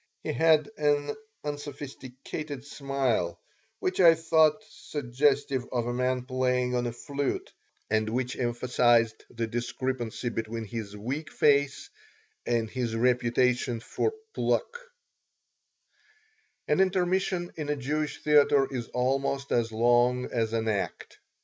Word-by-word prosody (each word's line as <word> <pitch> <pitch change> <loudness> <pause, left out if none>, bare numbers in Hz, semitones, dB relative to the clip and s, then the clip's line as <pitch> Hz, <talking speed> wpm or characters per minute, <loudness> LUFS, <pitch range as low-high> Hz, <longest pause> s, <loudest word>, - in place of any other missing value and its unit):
He - - -2
had 155 +3 +4
an 145 -1 +1 0.3
unsophisticated 145 -1 -6
smile, 135 - -1 0.4
which 185 +1 -2
I 170 -3 +8
thought 160 +3 +3
suggestive 135 0 0
of 120 -2 0
a 120 - -2
man 125 0 0
playing 125 -1 0
on 120 0 0
a - - -2
flute 140 +4 -3 0.3
and 110 0 +1
which 125 +2 -2
emphasized 120 -2 +2
the 115 0 -3
discrepancy 120 +1 -3
between 115 0 -4
his 105 -2 -6
weak 135 +9 -4
face 140 -1 +2 0.6
and 115 -2 +1
his 120 -1 -3
reputation 120 0 +2
for 280 - -1 0.2
pluck 470 - 0 1.9
An - - +2
intermission 185 -1 +1
in 150 -2 -4
a 150 - +1
Jewish 150 +2 -3
theater 145 -2 +5
is 120 -3 -3
almost 135 +2 -1
as 115 -1 +1
long 120 +2 +3
as 115 -2 0
an 115 0 0
act. 105 -3 -3
130 Hz, 120 wpm, -28 LUFS, 120-145 Hz, 1.9 s, I